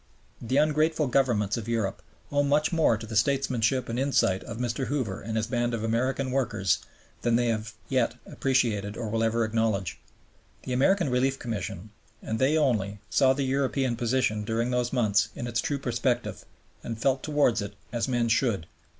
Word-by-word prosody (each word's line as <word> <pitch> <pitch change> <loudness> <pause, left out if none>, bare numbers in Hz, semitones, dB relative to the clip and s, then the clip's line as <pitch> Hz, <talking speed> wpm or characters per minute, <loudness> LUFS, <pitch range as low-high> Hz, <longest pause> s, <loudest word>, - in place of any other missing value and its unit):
The 125 +3 0
ungrateful 155 +1 +2
Governments 120 -6 +1
of 115 -1 -5
Europe 110 -4 -1 0.3
owe 145 0 +3
much 145 +3 +2
more 160 -9 +3
to 110 - -8
the 110 0 -7
statesmanship 130 0 +1
and 115 +2 -2
insight 130 -8 +2
of 115 - -6
Mr. 125 +2 -2
Hoover 130 -9 -2
and 110 +2 -3
his 110 - +1
band 120 0 0
of 110 - -4
American 130 +4 0
workers 110 -10 +1 0.4
than 120 -1 +2
they 120 0 +2
have 110 -1 -2
yet 125 -3 +1
appreciated 110 -6 0
or 115 -3 -3
will 115 +1 0
ever 115 0 +2
acknowledge. 110 -5 -1 0.6
The 125 - -3
American 155 +4 +3
Relief 135 +2 +1
Commission, 105 -4 -5 0.3
and 110 0 -4
they 140 +4 +3
only, 110 -9 +1
saw 130 +5 +4
the 140 +1 -1
European 135 -1 0
position 115 -3 0
during 115 +3 -1
those 125 -1 0
months 105 -6 +2
in - - -5
its 120 -2 -1
true 145 - -1
perspective 125 -2 -1 0.4
and 115 - -4
felt 130 +3 +1
towards 145 -7 +2
it 100 0 -6 0.2
as 120 +1 0
men 120 -2 +1
should. 115 -6 +1
120 Hz, 175 wpm, -27 LUFS, 110-135 Hz, 0.6 s, saw